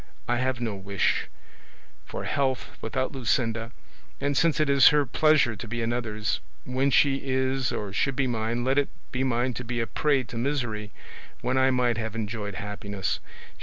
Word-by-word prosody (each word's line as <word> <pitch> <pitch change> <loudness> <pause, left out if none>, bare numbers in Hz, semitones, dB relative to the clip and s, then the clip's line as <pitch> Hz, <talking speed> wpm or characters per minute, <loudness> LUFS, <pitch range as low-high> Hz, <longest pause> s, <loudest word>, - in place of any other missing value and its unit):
I 120 - +2
have 130 0 0
no 115 -3 -2
wish 100 0 0 0.8
for - - -5
health 130 -4 -1
without 130 +5 -1
Luscinda; 120 -3 0 0.5
and 140 0 0
since 165 +3 +3
it 155 - +3
is 140 -1 +7
her 150 -1 +5
pleasure 145 -3 +3
to 105 - -7
be 115 +1 -2
another's, 115 -2 -1 0.3
when 130 +2 +1
she 135 0 +4
is 130 -2 0
or 100 -2 -4
should 135 +6 +1
be 140 - +1
mine, 120 0 -1
let 135 +3 +3
it 145 - 0 0.2
be 130 0 -1
mine 125 0 +1
to 125 - -5
be 120 0 -3
a 115 - +1
prey 140 +1 +1
to 120 -1 -8
misery 120 -6 -1 0.5
when 125 +1 0
I 130 0 +4
might 125 -3 +2
have 110 -1 -4
enjoyed 105 -2 -4
happiness. 100 -1 -3
120 Hz, 175 wpm, -27 LUFS, 110-135 Hz, 0.8 s, is